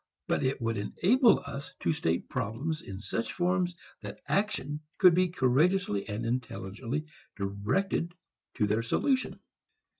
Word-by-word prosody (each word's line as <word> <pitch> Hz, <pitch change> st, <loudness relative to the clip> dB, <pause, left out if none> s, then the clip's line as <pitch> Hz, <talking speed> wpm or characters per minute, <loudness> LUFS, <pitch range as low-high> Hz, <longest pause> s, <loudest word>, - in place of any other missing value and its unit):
But -, -, 0 dB
it 130 Hz, +1 st, 0 dB
would 115 Hz, -2 st, -1 dB
enable 220 Hz, -, +4 dB
us 140 Hz, +1 st, -6 dB
to -, -, +2 dB
state 85 Hz, -, -1 dB
problems 135 Hz, +10 st, -2 dB
in 95 Hz, -, -7 dB
such 105 Hz, +3 st, -3 dB
forms 180 Hz, 0 st, +1 dB, 0.3 s
that -, -, -7 dB
action 170 Hz, -8 st, 0 dB, 0.2 s
could 180 Hz, -2 st, +7 dB
be 185 Hz, +2 st, +4 dB
courageously 135 Hz, -, +2 dB
and 105 Hz, +2 st, -3 dB
intelligently 120 Hz, +3 st, -3 dB, 0.3 s
directed 110 Hz, -, -1 dB, 0.4 s
to 105 Hz, -, +2 dB
their 105 Hz, +2 st, +1 dB
solution. 260 Hz, -, 0 dB
135 Hz, 130 wpm, -30 LUFS, 110-180 Hz, 0.4 s, could